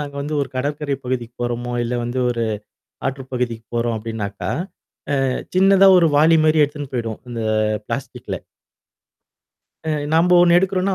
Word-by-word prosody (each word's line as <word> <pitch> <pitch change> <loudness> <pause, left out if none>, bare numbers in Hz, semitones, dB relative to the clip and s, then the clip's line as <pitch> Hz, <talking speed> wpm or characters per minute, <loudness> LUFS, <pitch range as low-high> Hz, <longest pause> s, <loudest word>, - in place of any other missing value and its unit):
நாங்க 145 -1 -6
வந்து 150 +2 -3
ஒரு 135 - -2
கடற்கரை 145 +1 -2
பகுதிக்கு 120 -2 -3
போறோமோ, 120 0 -3
இல்ல 120 +1 -2
வந்து 120 +2 -3
ஒரு 115 -1 -1 0.6
ஆற்று 135 -1 -3
பகுதிக்கு 120 -3 -2
போறோம் 115 -1 0
அப்டின்னாக்கா, 105 -2 -4 0.8
அ 130 - +1 0.3
சின்னதா 195 +1 +6
ஒரு 170 -2 +5
வாளி 160 +2 +5
மாரி 155 0 +4
எடுத்துன்னு 145 -2 -8
போய்டுவோம். 115 -3 -3
அந்த 115 -1 -4 0.5
பிளாஸ்டிக்ல. - - -5 1.5
அ, 160 - -6 0.3
நம்ப 175 +2 +4
ஒண்ணு 175 0 +6
எடுக்குறோம்னா, 190 +1 0
135 Hz, 145 wpm, -20 LUFS, 120-160 Hz, 1.5 s, சின்னதா